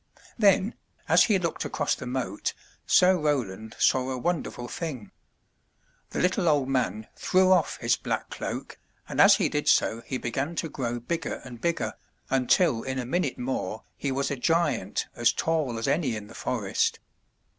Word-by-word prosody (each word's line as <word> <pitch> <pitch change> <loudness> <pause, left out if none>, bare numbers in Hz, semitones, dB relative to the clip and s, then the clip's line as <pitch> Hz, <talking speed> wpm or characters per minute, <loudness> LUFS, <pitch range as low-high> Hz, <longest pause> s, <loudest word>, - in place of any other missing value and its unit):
Then, 205 0 +4 0.3
as - - +6
he 210 -4 +3
looked 170 -3 -2
across - - -1
the 125 - -6
moat. 125 -6 -3 0.3
Sir 185 0 +5
Roland 115 -9 -2
saw 130 0 +3
a 130 - -2
wonder 170 +5 -1
ful 120 - -8
thing. 130 - -5 1.0
The - - -4
little 180 -1 +2
old 145 -3 +2
man 110 -5 0
threw 185 0 +3
off 180 -4 +3
his - - +1
black - - -3
cloak, - - -5 0.3
and - - +1
as - - +8
he - - +1
did - - -2
so 115 - +3
he 130 - -3
began 135 +7 -3
to 165 - -2
grow 120 -4 -3
bigger 165 +8 -3
and 120 -3 -10
bigger, 170 -1 -1 0.4
until 130 0 +3
in 130 +1 -4
a 125 - -2
minute 145 +1 -1
more 120 -4 -3
he 140 - -3
was 140 +2 -1
a - - 0
giant 140 - 0
as 120 -1 +3
tall 150 -3 -1
as 115 - -2
any 140 -4 +1
in 105 -1 -6
the 110 - -13
forest. 105 -7 -1
130 Hz, 175 wpm, -27 LUFS, 120-165 Hz, 1.0 s, as